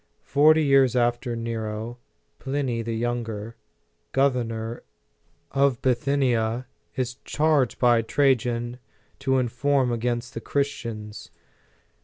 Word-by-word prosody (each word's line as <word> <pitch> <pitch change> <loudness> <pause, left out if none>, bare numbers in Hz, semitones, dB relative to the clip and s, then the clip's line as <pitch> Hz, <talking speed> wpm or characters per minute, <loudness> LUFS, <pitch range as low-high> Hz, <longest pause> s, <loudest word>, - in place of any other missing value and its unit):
Forty 155 +3 +5
years 135 -3 +4
after 120 0 +1
Nero, 115 0 -4 0.4
Pliny 135 -4 -2
the 115 0 -3
Younger, 115 -2 -3 0.6
governor 120 -4 0 0.7
of 135 -3 +2
Bithynia, 125 -3 +1 0.3
is 125 -1 -2
charged 150 -5 +1
by 120 -2 +4
Trajan 120 -1 +1 0.4
to: 135 0 -2
nform 130 +1 +1
against 120 +1 -2
the 115 - -5
Christians. 115 -6 -3
120 Hz, 95 wpm, -25 LUFS, 115-135 Hz, 0.7 s, Forty